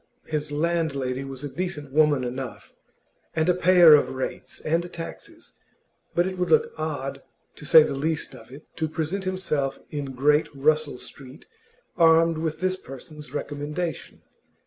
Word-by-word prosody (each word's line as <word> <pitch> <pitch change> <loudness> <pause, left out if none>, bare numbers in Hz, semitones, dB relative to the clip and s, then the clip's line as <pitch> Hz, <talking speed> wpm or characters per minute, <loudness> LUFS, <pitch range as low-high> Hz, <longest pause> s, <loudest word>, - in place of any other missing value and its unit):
His 150 -1 -3
landlady 145 -5 -1
was 135 0 -7
a - - -2
decent 150 -3 -5
woman 150 -3 +4
enough, 125 +1 -6 0.6
and 160 +1 +1
a 180 - +5
payer 180 -2 +7
of 150 - +5
rates 130 0 -5
and 170 +3 -1
taxes, 165 -2 -9 0.6
but 175 - +3
it 185 -1 -4
would 180 - 0
look 465 0 +3
odd, 140 -3 -4 0.4
to - - -10
say 155 +2 +8
the 145 - -2
least 155 +3 -2
of 110 - -13
it, 140 +4 -12
to 160 -1 -1
present 175 +5 -3
oneself 155 -7 -1
in 140 -3 -4
Great 150 +4 +3
Russell 150 0 +1
Street 130 +2 -9 0.5
armed 165 -1 +5
with 160 0 -3
this 185 0 0
person's 150 +1 -10
recommendation. 150 +2 -4
155 Hz, 150 wpm, -25 LUFS, 140-165 Hz, 0.6 s, say